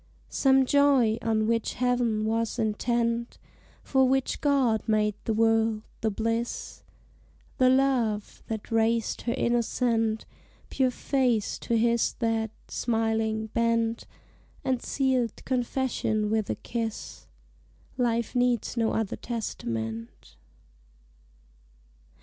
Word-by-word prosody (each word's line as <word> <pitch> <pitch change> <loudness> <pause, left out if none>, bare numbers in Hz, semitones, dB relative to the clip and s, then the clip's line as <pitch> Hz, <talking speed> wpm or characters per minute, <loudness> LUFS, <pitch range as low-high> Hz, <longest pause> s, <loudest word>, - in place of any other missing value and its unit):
Some 265 -1 +4
joy, 265 -5 +4
on 220 -1 +1
which 230 0 0
Heav'n 245 -4 +1
was 225 +1 -1
intent 235 +1 -1 0.5
For 265 -1 +3
which 265 0 0
God 265 -7 +2
made 215 -1 +2
the 225 - 0
world 225 -1 +2 0.2
the 220 - +1
bliss, 230 +3 -3 0.8
The 255 -1 +6
love, 255 -6 +1
that 220 +1 -5
raised 225 0 +1
her 235 - -1
innocent 235 -2 0 0.5
Pure 260 -1 +2
face 250 -4 0
to 235 - 0
his 235 +1 +2
that, 225 -2 -1 0.2
smiling, 225 -1 -1
bent 230 0 0 0.6
And 260 -2 0
sealed 260 -4 -1
confession 245 -4 -1
with 220 -2 0
a - - 0
kiss 225 -2 -5 0.7
Life 235 -2 0
needs 245 -2 +1
no 225 -2 +1
other 220 -3 -1
testament. 115 - -5
230 Hz, 105 wpm, -27 LUFS, 220-245 Hz, 0.8 s, The